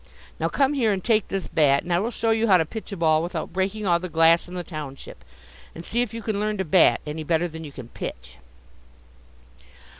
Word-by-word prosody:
Now - - 0
come 275 0 +2
here 240 -7 +2
and 190 -2 -2
take 220 -3 +2
this 195 -2 -3
bat, 140 -3 +3
and 175 - -2
I 170 - +3
will 220 +5 -1
show 225 -1 -1
you 225 +1 +2
how 190 -3 +6
to 160 - +1
pitch 220 +7 -8
a 200 - -5
ball 160 -2 +3
without 170 -1 -4
breaking 195 +3 -2
all 170 -2 +3
the 185 +1 -6
glass 165 +1 +4
in 180 - -9
the 180 - -3
township. 150 -5 -8 0.5
And 165 - -8
see 240 - 0
if 245 - -2
you 230 -1 -7
can 210 -2 -2
learn 210 0 -1
to 190 - -2
bat 170 +3 +4
any 155 +1 -5
better 165 +2 +1
than 160 -1 -9
you 150 - -8
can 130 -4 -10
pitch." 65 - -8
175 Hz, 235 wpm, -24 LUFS, 160-215 Hz, 0.5 s, how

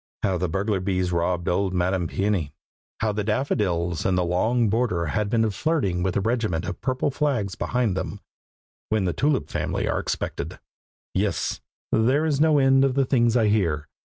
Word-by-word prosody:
How 95 -3 +1
the 90 0 -1
burglar 100 +3 0
bees 90 -1 -1
robbed 85 0 0
old 95 +1 0
Madam 90 0 +1
Peony, 95 -6 -1 0.5
how 110 0 +2
the 105 0 -2
daffodils 95 - 0
in 95 - +1
the 90 -1 +1
long 110 +7 +2
border 105 -6 0
had 105 +6 -1
been 115 0 +2
flirting 100 - 0
with 90 0 -1
the 100 - +2
regiment 110 -7 0
of 90 - -5
purple 130 +2 0
flags 130 -9 0
behind 120 -5 0
them, 95 - -4 0.7
when 110 -3 +1
the 90 - 0
Tulip 140 - +1
family - - -1
are - - 0
expected; - - -4 0.6
yes, - - -1 0.3
there 130 +8 +3
is 150 -2 +1
no 155 -1 +5
end 135 -1 +5
to 135 - +4
the 135 +1 +1
things 120 -2 +3
I 110 -3 +3
hear. 80 -8 +1
105 Hz, 180 wpm, -24 LUFS, 90-125 Hz, 0.7 s, no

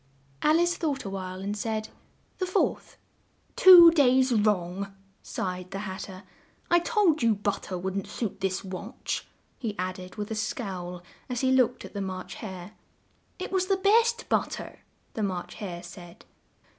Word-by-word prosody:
Al 310 +2 +4
ice 345 0 +2
thought 290 - -2
a 195 - -4
while, 185 -1 -5
and 200 +2 -3
said, 215 +1 -3 0.5
"The 370 - -1
fourth." 370 - -1 0.6
"Two 350 -3 +10
days 260 -4 +4
wrong!" 200 -3 0 0.3
sighed 185 -1 -4
the 195 - -5
Hat 190 0 -5
ter. 190 0 -11 0.5
"I 345 - +6
told 345 -4 +2
you 230 -2 +3
but 205 0 -2
ter 185 - -5
wouldn't 190 +2 -3
suit 205 -4 -4
this 190 -1 -1
watch," 195 +5 -5 0.3
he 220 -5 -4
add 185 0 -3
ed 180 0 -10
with 210 0 -5
a - - 0
scowl 185 -5 -4 0.3
as 245 -1 -2
he 260 -1 +2
looked 260 -2 +2
at - - -11
the 200 - -3
March 185 -1 -5
Hare. 185 -3 -7 0.7
"It 370 - -5
was 375 -1 +1
the 390 -1 +2
best 460 +4 +3
but - - +1
ter," - - -8 0.3
the 220 - -3
March 185 -4 -3
Hare 175 -4 -5
said. 175 -1 -12
205 Hz, 170 wpm, -27 LUFS, 185-270 Hz, 0.7 s, Two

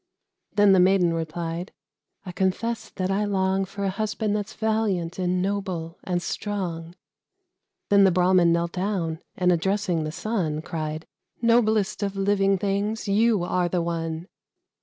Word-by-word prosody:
Then 205 -1 +6
the 190 - +6
Maiden 180 -2 +4
replied, 165 +2 -4 0.5
"I 180 - -5
confess 195 +5 -1
that 185 0 -2
I 200 +2 +1
long 190 -1 +1
For 200 +1 -6
a 195 - +1
husband 215 +1 -1
that's 210 +1 -4
valiant, 210 -6 -1
and 180 0 0
noble, 185 -4 -3
and 175 -1 -1
strong." 175 -5 -4 0.9
Then 200 -1 +6
the 195 - +6
Brahmin 180 -1 +4
knelt 170 0 +1
down, 180 -4 -2 0.2
and 180 -1 +3
addressing 180 -1 0
the 155 - -3
Sun, 165 -6 -2
Cried, 155 -2 -4 0.4
"Noblest 220 -3 +2
of 200 -1 -2
living 195 0 +2
things, 205 +3 -1
you 210 -1 +3
are 180 0 0
the 175 -1 0
one!" 165 0 -3
190 Hz, 145 wpm, -25 LUFS, 170-205 Hz, 0.9 s, Then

